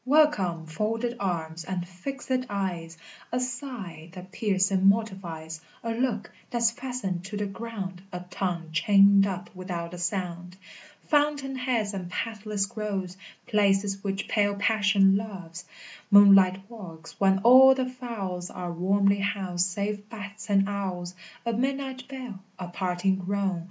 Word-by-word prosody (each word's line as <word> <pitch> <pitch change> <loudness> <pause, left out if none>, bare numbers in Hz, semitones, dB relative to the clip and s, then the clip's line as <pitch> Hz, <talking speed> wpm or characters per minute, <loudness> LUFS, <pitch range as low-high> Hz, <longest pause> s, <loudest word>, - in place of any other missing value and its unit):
Welcome, 255 - +3
folded 225 +8 -2
arms, 170 -4 -2
and 185 -1 -3
fixèd 255 +7 -4
eyes, 175 -5 -3 0.3
A 250 - 0
sigh 245 - -5
that 185 0 -10
piercing 195 -3 +2
mortifies, 175 -7 -2 0.2
A 230 - -2
look 230 -2 -1 0.2
that's 235 -1 +2
fastened 235 -8 -4
to 205 +2 -5
the 205 - -1
ground, 195 -3 -6
A 180 -1 -5
tongue 170 -4 -3
chained 200 +3 +6
up 185 -1 -5
without 180 -2 -5
a 180 - -7
sound! 180 0 -3 0.5
Fountain 290 -3 +1
heads 245 -5 -1
and 185 -3 -5
pathless 210 0 -2
groves, 200 -4 -4 0.3
Places 200 -1 +2
which 195 -1 -2
pale 205 -1 +2
passion 200 -2 +4
loves! 180 -5 -7 0.4
Moonlight 195 -2 +7
walks, 175 -8 -11
when 195 -1 +4
all 260 +2 +9
the 260 -1 -1
fowls 210 -8 -5
Are 180 -1 -5
warmly 200 +3 +2
housed 190 -3 0
save 205 +2 -3
bats 210 -2 -8
and 195 -1 +4
owls! 185 -3 -3 0.3
A 235 - 0
midnight 265 +1 -2
bell, 255 -7 -7 0.2
a 180 -1 -6
parting 185 +1 0
groan! 190 -1 -1
200 Hz, 135 wpm, -27 LUFS, 180-225 Hz, 0.5 s, all